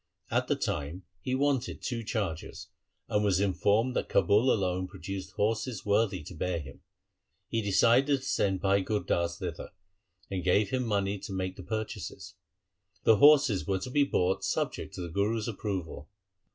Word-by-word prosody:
At -, -, +1 dB
the -, -, +2 dB
time 75 Hz, +6 st, -3 dB, 0.2 s
he 130 Hz, +6 st, -2 dB
wanted 135 Hz, -2 st, 0 dB
two 120 Hz, -2 st, -3 dB
chargers, 100 Hz, -8 st, -4 dB, 0.4 s
and 105 Hz, 0 st, +1 dB
was 95 Hz, -3 st, +2 dB
informed 105 Hz, +5 st, +2 dB
that -, -, -1 dB
Kabul 105 Hz, +5 st, +4 dB
alone 95 Hz, -2 st, 0 dB
produced 95 Hz, +2 st, -7 dB
horses 110 Hz, +1 st, -1 dB
worthy 100 Hz, -4 st, +1 dB
to 80 Hz, -, -9 dB
bear 90 Hz, +1 st, -2 dB
him. 70 Hz, -3 st, -10 dB, 0.7 s
He 115 Hz, -, 0 dB
decided 120 Hz, +7 st, +3 dB
to -, -, -9 dB
send 95 Hz, -7 st, 0 dB
Bhai 100 Hz, 0 st, +3 dB
Gur 105 Hz, +2 st, -1 dB
Das 85 Hz, 0 st, -1 dB
thither, 90 Hz, -5 st, -5 dB, 0.6 s
and 95 Hz, -2 st, -2 dB
gave 100 Hz, +2 st, +2 dB
him 125 Hz, -2 st, 0 dB
money 100 Hz, -1 st, 0 dB
to 100 Hz, -, -8 dB
make 95 Hz, -1 st, -3 dB
the -, -, -9 dB
purchases. 110 Hz, +3 st, -5 dB, 0.7 s
The 110 Hz, -, +6 dB
horses 145 Hz, -8 st, +5 dB
were 95 Hz, -1 st, +1 dB
to 95 Hz, +7 st, -6 dB
be 145 Hz, +2 st, +4 dB
bought 95 Hz, -8 st, 0 dB
subject -, -, -2 dB
to -, -, -5 dB
the 85 Hz, -, -5 dB
Guru's 105 Hz, +5 st, 0 dB
approval. 95 Hz, -8 st, -4 dB
100 Hz, 165 wpm, -29 LUFS, 95-115 Hz, 0.7 s, The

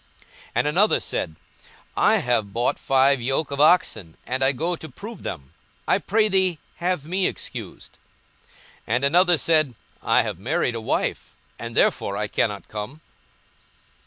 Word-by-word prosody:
42:014:019 -, -, -32 dB, 0.3 s
And -, -, +2 dB
another 190 Hz, +8 st, +3 dB
said, 80 Hz, -, -3 dB, 0.6 s
I -, -, +4 dB
have 115 Hz, -5 st, 0 dB
bought 120 Hz, +4 st, 0 dB
five 135 Hz, 0 st, +3 dB
yoke 135 Hz, +5 st, -1 dB
of 140 Hz, 0 st, -1 dB
oxen, 150 Hz, -, +3 dB
and 130 Hz, +1 st, 0 dB
I 135 Hz, -, +5 dB
go 165 Hz, +6 st, -1 dB
to 160 Hz, -1 st, -10 dB
prove 205 Hz, -, -9 dB
them: 65 Hz, -1 st, -7 dB, 0.3 s
I -, -, +3 dB
pray 215 Hz, +2 st, +2 dB
thee 190 Hz, -4 st, +2 dB, 0.2 s
have 175 Hz, -4 st, -1 dB
me 185 Hz, +3 st, +1 dB
excused. -, -, -8 dB, 0.9 s
42:014:020 115 Hz, -, +1 dB
And 125 Hz, -, 0 dB
another 175 Hz, +4 st, +4 dB
said, 155 Hz, -4 st, +2 dB, 0.3 s
I -, -, +3 dB
have -, -, -5 dB
married 120 Hz, -, 0 dB
a 115 Hz, -, -4 dB
wife, -, -, -2 dB, 0.2 s
and -, -, -6 dB
therefore 100 Hz, -, +2 dB
I 105 Hz, -, -1 dB
cannot 105 Hz, -1 st, -1 dB
come. 110 Hz, +9 st, -7 dB
140 Hz, 160 wpm, -23 LUFS, 120-175 Hz, 0.9 s, I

